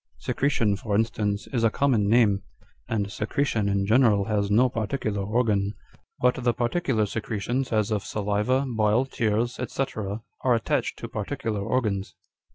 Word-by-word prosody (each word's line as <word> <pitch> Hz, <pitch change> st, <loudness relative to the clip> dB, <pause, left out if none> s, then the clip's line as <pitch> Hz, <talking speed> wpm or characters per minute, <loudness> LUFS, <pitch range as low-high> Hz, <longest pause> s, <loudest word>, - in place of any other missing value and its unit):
Secretion, 115 Hz, -7 st, +1 dB
for 100 Hz, +1 st, -2 dB
instance, 105 Hz, -2 st, 0 dB
is 120 Hz, -3 st, +1 dB
a 115 Hz, -, +5 dB
common 115 Hz, -5 st, +2 dB
name, 105 Hz, -4 st, +4 dB, 0.5 s
and 100 Hz, -3 st, -1 dB
secretion 110 Hz, -1 st, 0 dB
in 100 Hz, 0 st, +1 dB
general 110 Hz, -2 st, +4 dB
has 100 Hz, -1 st, 0 dB
no 115 Hz, +5 st, +5 dB
particular 110 Hz, -3 st, -2 dB
organ; 105 Hz, -1 st, 0 dB, 0.4 s
but 125 Hz, 0 st, +2 dB
the 120 Hz, -1 st, +2 dB
par 120 Hz, -1 st, 0 dB
ticular 125 Hz, -11 st, 0 dB
secretions, 115 Hz, +5 st, -2 dB
as 110 Hz, -1 st, +1 dB
of 105 Hz, -2 st, 0 dB
saliva, 105 Hz, +6 st, 0 dB
bile, 110 Hz, +1 st, +2 dB
tears, 115 Hz, -1 st, -1 dB
&c. 135 Hz, -, 0 dB, 0.6 s
are 125 Hz, -2 st, +4 dB
attached 115 Hz, -, -1 dB
to -, -, -6 dB
particular 105 Hz, -3 st, -3 dB
organs. 100 Hz, -4 st, -1 dB
110 Hz, 150 wpm, -26 LUFS, 105-125 Hz, 0.6 s, a